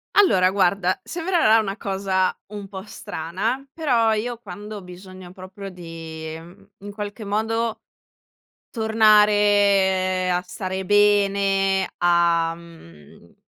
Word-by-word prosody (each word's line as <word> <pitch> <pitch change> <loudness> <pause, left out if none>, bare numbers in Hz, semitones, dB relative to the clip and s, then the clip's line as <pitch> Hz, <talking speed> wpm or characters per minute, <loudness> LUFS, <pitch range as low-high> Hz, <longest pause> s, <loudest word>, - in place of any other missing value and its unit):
Allora 190 - +4
guarda, 185 -1 +1
sembrerà 335 -10 +2
una 200 -1 -3
cosa 190 -1 -1
un 205 -1 -8
po' 190 -1 -8
strana, 215 +8 -4
però 245 -9 +1
io 235 +2 -3
quando 210 0 -9
ho - - -9
bisogno 185 0 -12
proprio 190 +2 -10
di, 165 -2 -8
mhmm, 175 +5 -15 0.2
in 205 - -7
qualche 205 +1 -6
modo 220 +2 -1 0.9
tornare 205 -4 +3
a 180 - +1
stare 190 0 -5
bene, 200 -1 +2
a, 170 -1 +2
mhmm, 85 - -16
uhm, - - -22
195 Hz, 115 wpm, -22 LUFS, 180-210 Hz, 0.9 s, Allora